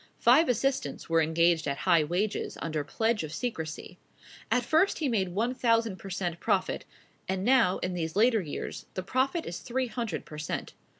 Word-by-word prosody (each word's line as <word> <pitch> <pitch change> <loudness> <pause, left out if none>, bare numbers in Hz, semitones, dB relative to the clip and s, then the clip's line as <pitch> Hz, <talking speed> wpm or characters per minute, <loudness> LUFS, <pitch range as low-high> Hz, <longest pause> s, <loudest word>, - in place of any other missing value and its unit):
Five 270 +6 +5
assistants 245 - -1
were 165 0 +5
engaged 160 0 +2
at 140 0 -1
high 170 -4 +5
wages, 185 +7 -2
under 155 -2 -2
pledge 220 +8 0
of 155 - -6
secrecy. 160 -6 -5 0.5
At 245 -1 +2
first 320 +9 +3
he 310 - 0
made 200 -7 +1
one 225 +8 0
thousand 230 -5 +1
per 195 - -9
cent 175 -2 -3
profit; 200 -4 0 0.4
and 190 0 -1
now, 240 -7 +4
in 180 - -1
these 165 -2 -3
later 225 +1 +4
years, 155 -5 -6
the 185 - -3
profit 265 - 0
is 170 - -5
three 255 +1 -2
hundred 230 -5 -4
per 150 - -9
cent. 155 - -4
195 Hz, 180 wpm, -29 LUFS, 165-240 Hz, 0.5 s, Five